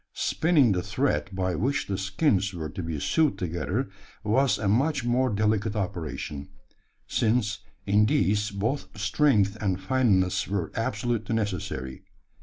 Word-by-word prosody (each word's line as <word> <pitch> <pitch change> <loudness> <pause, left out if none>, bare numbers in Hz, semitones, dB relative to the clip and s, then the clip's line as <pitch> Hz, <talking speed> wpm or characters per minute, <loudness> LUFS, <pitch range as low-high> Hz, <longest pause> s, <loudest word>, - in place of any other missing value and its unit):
Spinning 155 -8 +3
the 90 -2 +1
thread 75 -3 -1
by 95 -1 -1
which 135 +10 0
the 100 - -2
skins 100 - +1
were 80 -2 -4
to 95 - -5
be 80 -3 -4
sewed 155 - +2
together, 90 +7 -2 0.4
was 130 +6 +2
a 105 - -2
much 135 +5 +1
more 125 +2 +2
delicate 105 0 0
operation: 75 -7 -4 0.6
since 110 -3 +1 0.3
in 105 +1 +4
these 105 +1 +2
both 115 +8 -2
strength 105 -2 +2
and 95 -3 0
fineness 95 -4 +2
were 95 -4 -2
absolutely 115 -1 -1
necessary. 90 -11 -3
105 Hz, 135 wpm, -26 LUFS, 95-120 Hz, 0.6 s, in